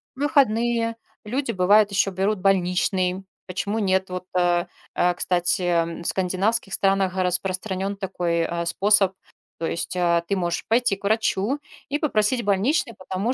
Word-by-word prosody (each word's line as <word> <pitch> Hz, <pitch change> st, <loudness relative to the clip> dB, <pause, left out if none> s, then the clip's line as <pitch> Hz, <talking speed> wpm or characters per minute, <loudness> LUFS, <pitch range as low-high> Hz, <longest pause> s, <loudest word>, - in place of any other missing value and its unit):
выходные. 240 Hz, -5 st, +2 dB, 0.3 s
Люди, 250 Hz, +4 st, -2 dB
бывает, 205 Hz, +2 st, +4 dB
ещё 195 Hz, 0 st, +1 dB
берут 195 Hz, +2 st, 0 dB
больничный. 185 Hz, 0 st, +1 dB, 0.2 s
Почему 200 Hz, +4 st, -2 dB
нет? 190 Hz, -2 st, +1 dB
Вот, 180 Hz, 0 st, -5 dB
э 175 Hz, 0 st, +2 dB, 0.3 s
э, 180 Hz, 0 st, +2 dB
кстати, 175 Hz, -2 st, 0 dB
в -, -, -15 dB
скандинавских 195 Hz, +3 st, 0 dB
странах 195 Hz, -1 st, +1 dB
распространён 185 Hz, +2 st, -1 dB
такой, 180 Hz, -3 st, -2 dB
э, 170 Hz, +1 st, -2 dB
способ. 195 Hz, +2 st, +3 dB, 0.5 s
То 165 Hz, -, -1 dB
есть, 170 Hz, -, -3 dB
э, 170 Hz, -1 st, +2 dB
ты 200 Hz, -, 0 dB
можешь 175 Hz, -1 st, -2 dB
пойти 230 Hz, -2 st, +2 dB
к 195 Hz, -, -21 dB
врачу 220 Hz, +4 st, +1 dB, 0.3 s
и 290 Hz, +2 st, -1 dB
попросить 240 Hz, -4 st, +1 dB
больничный, 225 Hz, -, +1 dB
потому 190 Hz, +6 st, -2 dB
190 Hz, 140 wpm, -23 LUFS, 180-215 Hz, 0.5 s, бывает